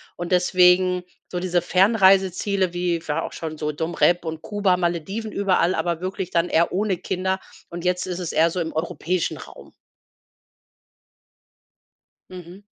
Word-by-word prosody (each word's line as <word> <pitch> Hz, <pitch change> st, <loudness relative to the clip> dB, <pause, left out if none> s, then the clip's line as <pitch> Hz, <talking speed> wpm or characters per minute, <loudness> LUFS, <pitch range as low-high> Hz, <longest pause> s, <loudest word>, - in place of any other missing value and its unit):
Und 175 Hz, +1 st, -6 dB
deswegen 180 Hz, 0 st, +4 dB, 0.3 s
so 180 Hz, -, -3 dB
diese 180 Hz, -1 st, +1 dB
Fernreiseziele 190 Hz, -1 st, +3 dB
wie 175 Hz, -2 st, -1 dB
war 150 Hz, +2 st, 0 dB
auch -, -, -6 dB
schon 160 Hz, -1 st, -6 dB
so 150 Hz, 0 st, -3 dB
Dom 160 Hz, +3 st, -4 dB
Rep 175 Hz, 0 st, +3 dB
und 160 Hz, -1 st, -5 dB
Kuba, 200 Hz, -3 st, +1 dB
Malediven, 180 Hz, +5 st, -3 dB
überall, 185 Hz, -3 st, +1 dB
aber 165 Hz, 0 st, -1 dB
wirklich 185 Hz, 0 st, -4 dB
dann 170 Hz, 0 st, +1 dB
eher 170 Hz, -1 st, +2 dB
ohne 200 Hz, +1 st, 0 dB
Kinder, 190 Hz, +1 st, -2 dB, 0.3 s
und 170 Hz, 0 st, -7 dB
jetzt 180 Hz, 0 st, 0 dB
ist 180 Hz, -1 st, -4 dB
es 175 Hz, -3 st, -4 dB
eher 165 Hz, +1 st, +3 dB
so 180 Hz, -, -2 dB
im 165 Hz, -1 st, -3 dB
europäischen 170 Hz, +2 st, -2 dB
Raum. -, -, -13 dB, 2.6 s
Mhm. 180 Hz, +1 st, -11 dB
180 Hz, 150 wpm, -23 LUFS, 170-185 Hz, 2.6 s, deswegen